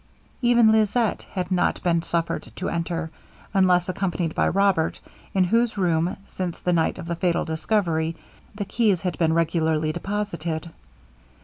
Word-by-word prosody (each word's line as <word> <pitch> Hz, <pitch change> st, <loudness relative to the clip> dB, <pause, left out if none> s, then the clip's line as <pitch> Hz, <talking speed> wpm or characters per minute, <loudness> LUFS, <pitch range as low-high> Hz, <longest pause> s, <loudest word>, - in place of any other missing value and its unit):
Even 240 Hz, -2 st, +5 dB
Lisette 220 Hz, +1 st, +1 dB
had 185 Hz, -1 st, -3 dB
not 180 Hz, -, +1 dB
been 170 Hz, -2 st, +2 dB
suffered 170 Hz, 0 st, -2 dB
to 185 Hz, -, -3 dB
enter, 165 Hz, -1 st, -3 dB, 0.4 s
unless 180 Hz, -2 st, +4 dB
accompanied 180 Hz, -3 st, -1 dB
by -, -, +2 dB
Robert, 195 Hz, -4 st, +2 dB, 0.4 s
in 190 Hz, -, +4 dB
whose 230 Hz, +4 st, +1 dB
room, 170 Hz, -2 st, +1 dB
since 180 Hz, -4 st, -5 dB
the 180 Hz, -, 0 dB
night 165 Hz, -1 st, +1 dB
of 180 Hz, -, -7 dB
the 170 Hz, 0 st, -2 dB
fatal 170 Hz, 0 st, 0 dB
discovery, 160 Hz, -1 st, 0 dB, 0.4 s
the 205 Hz, -1 st, -3 dB
keys 205 Hz, -5 st, +1 dB
had 180 Hz, 0 st, -2 dB
been 160 Hz, -2 st, +3 dB
regularly 160 Hz, -2 st, +1 dB
deposited. 170 Hz, -3 st, -3 dB
175 Hz, 145 wpm, -24 LUFS, 165-200 Hz, 0.4 s, Even